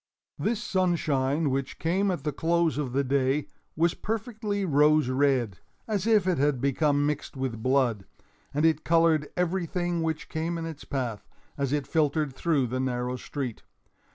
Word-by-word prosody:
This 230 +1 -1
sunshine, 155 - +1
which 135 0 -2
came 190 +5 +1
at 180 - -2
the 150 - -1
close 165 +1 +1
of 135 -4 -2
the 140 +2 +1
day, 135 +2 +1 0.3
was 165 +1 +2
perfectly 215 -2 -3
rose 150 -3 +4
red—as 135 - -1
if 215 -4 +4
it 185 -5 +1
had 145 -2 +2
become 145 +2 +2
mixed 145 -1 -3
with 130 -4 -3
blood—and 130 +3 -1
it 155 -1 +2
colored 165 -2 +3
everything 175 -1 -1
which 160 -1 -2
came 165 +2 -2
in 165 - -4
its 160 -3 -7
path, 120 -8 -3 0.3
as 140 -2 -1
it 145 -1 0
filtered 150 -3 +1
through 150 -3 +1
the 125 +2 -3
narrow 125 -1 -1
street. 130 -2 -5
150 Hz, 155 wpm, -27 LUFS, 135-170 Hz, 0.3 s, rose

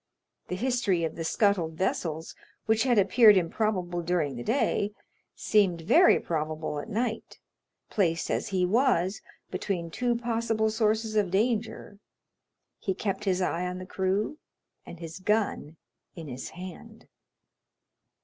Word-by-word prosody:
The 180 - -3
history 215 -5 0
of 160 - -2
the 165 - -4
scuttled 185 -3 +1
vessels, 165 -2 -2 0.3
which 220 0 +2
had 245 -3 +3
appeared 210 +1 +6
improbable 180 -1 -1
during 165 -5 -1
the 120 - -6
day, 210 - 0 0.4
seemed 190 -6 +2
very 335 - +5
probable 155 -2 -3
at - - -7
night; 225 +1 -3 0.5
placed 170 -5 0
as - - -1
he 190 -3 +1
was 200 -3 +2 0.3
between 170 -4 -3
two 240 +5 0
possible 230 -2 0
sources 220 0 0
of 205 -3 +2
danger, 210 0 -1 0.8
he 190 - -2
kept 205 +1 -3
his 185 -1 +1
eye 180 0 -1
on 180 0 -4
the 185 - -7
crew, 195 +10 -1 0.5
and 170 - -10
his 165 +1 -8
gun 195 -6 -1 0.4
in 165 -3 -8
his 125 -1 -6
hand. 185 +6 -10
190 Hz, 135 wpm, -28 LUFS, 170-220 Hz, 0.8 s, appeared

